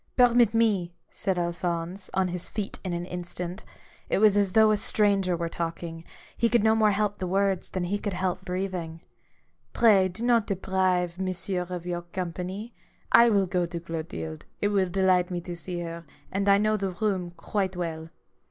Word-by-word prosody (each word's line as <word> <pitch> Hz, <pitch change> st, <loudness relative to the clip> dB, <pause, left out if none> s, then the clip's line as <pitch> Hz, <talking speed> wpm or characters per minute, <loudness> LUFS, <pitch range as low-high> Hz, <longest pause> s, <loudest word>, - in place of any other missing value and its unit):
" -, -, -45 dB
Permit 240 Hz, -3 st, +5 dB
me 200 Hz, -7 st, +2 dB
I -, -, -46 dB
" -, -, -40 dB
said 190 Hz, -3 st, -2 dB
Alphonse, 175 Hz, +1 st, -2 dB
on 190 Hz, -1 st, +2 dB
his 175 Hz, 0 st, -3 dB
feet 210 Hz, -2 st, -4 dB
in 185 Hz, -, -3 dB
an 175 Hz, 0 st, -3 dB
instant. 180 Hz, +1 st, -6 dB, 0.5 s
It -, -, +2 dB
was 210 Hz, 0 st, +5 dB
as 200 Hz, -2 st, +2 dB
though 220 Hz, -1 st, +6 dB
a 210 Hz, -, +3 dB
stranger 200 Hz, -4 st, +2 dB
were 170 Hz, 0 st, -2 dB
talking: 165 Hz, 0 st, -5 dB, 0.3 s
he 230 Hz, -, +2 dB
comd 235 Hz, -3 st, +3 dB
no 220 Hz, 0 st, +5 dB
more 220 Hz, -1 st, +4 dB
help 205 Hz, 0 st, 0 dB
the 185 Hz, -, -2 dB
words 195 Hz, 0 st, 0 dB
than 185 Hz, -, -3 dB
he 200 Hz, +4 st, -1 dB
could 205 Hz, -2 st, -3 dB
help 185 Hz, 0 st, -2 dB
breathing. 180 Hz, -3 st, -4 dB, 0.4 s
" -, -, -42 dB
Pray 205 Hz, -5 st, +5 dB
do 215 Hz, +6 st, -7 dB
not 235 Hz, -3 st, +3 dB
deprive 185 Hz, -2 st, 0 dB
Monsieur 185 Hz, -1 st, -2 dB
of 175 Hz, -1 st, -5 dB
your 175 Hz, -1 st, -2 dB
company. 185 Hz, +5 st, -5 dB, 0.4 s
I 235 Hz, 0 st, +7 dB
will 200 Hz, -3 st, +3 dB
go 180 Hz, -1 st, 0 dB
to 170 Hz, 0 st, -5 dB
Clotilde; 155 Hz, -, -6 dB
it 205 Hz, -, +1 dB
will 195 Hz, -3 st, +1 dB
delight 185 Hz, -1 st, +2 dB
me 175 Hz, -1 st, -2 dB
to 175 Hz, 0 st, -6 dB
see 175 Hz, +1 st, -5 dB
her, 170 Hz, 0 st, -6 dB, 0.3 s
and 195 Hz, +1 st, 0 dB
I 200 Hz, -, +7 dB
know 215 Hz, +1 st, +2 dB
the 195 Hz, -1 st, -2 dB
room 190 Hz, -2 st, -1 dB
quite 190 Hz, -3 st, -2 dB
well." 165 Hz, -2 st, -4 dB
185 Hz, 200 wpm, -27 LUFS, 175-205 Hz, 0.5 s, I